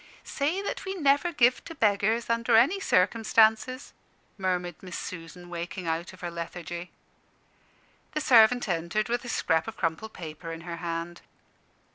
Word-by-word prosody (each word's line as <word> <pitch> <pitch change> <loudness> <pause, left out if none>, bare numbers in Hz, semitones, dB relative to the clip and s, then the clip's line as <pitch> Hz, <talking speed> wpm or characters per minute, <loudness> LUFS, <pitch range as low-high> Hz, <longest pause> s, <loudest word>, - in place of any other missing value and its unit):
"Say 320 +8 -1
that - - -4
we 385 0 -4
never 290 +1 +2
give 250 -5 +3
to 330 - -8
beggars, 220 0 +2
under 230 0 +2
any 275 - +5
circumstances," 225 - +2 0.4
murmured 180 -3 -2
Miss 180 -2 -7
Susan, 175 0 -8
waking 175 +1 -5
out 165 +2 -2
of 185 - -15
her 175 -1 -4
lethargy. 170 +1 -6 1.2
The 305 - -1
servant 245 -2 +5
entered 175 +5 -1
with 240 +1 -1
a - - -6
scrap 160 -7 +1
of - - -7
crumpled 165 +7 -2
paper 165 0 -8
in 165 0 -7
her 170 0 -6
hand. 170 0 -4
190 Hz, 150 wpm, -27 LUFS, 170-240 Hz, 1.2 s, any